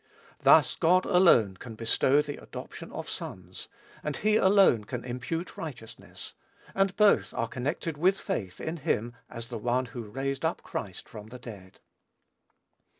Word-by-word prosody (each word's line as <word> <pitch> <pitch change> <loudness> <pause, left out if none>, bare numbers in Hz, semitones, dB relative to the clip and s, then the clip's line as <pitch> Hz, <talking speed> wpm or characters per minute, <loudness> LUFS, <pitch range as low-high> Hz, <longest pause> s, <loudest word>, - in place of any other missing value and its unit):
Thus, - - +6
God 180 +2 +3
alone 145 - +5
can 115 +2 -9
bestow 130 +6 +3
the 145 -1 -7
adoption - - -9
of - - -6
sons, - - -7 0.3
and 150 -2 -3
he 215 +1 +2
alone 190 - +5
can 120 +3 -5
impute 135 +8 -4
righteousness, 120 -8 -8 0.4
and 195 -1 +1
both 210 -1 +4
are 115 - 0
connected 145 +6 -3
with 190 +4 +3
faith 95 -4 -4
in 160 +2 -4
him 120 -6 -1 0.2
as 115 0 -7
the 120 -3 -5
One 125 +3 +1
who 120 - -4
raised 135 +3 -3
up - - -1
Christ - - -6
from 105 0 -10
the 125 +3 -9
dead. 105 -6 -11
130 Hz, 150 wpm, -28 LUFS, 115-170 Hz, 0.4 s, Thus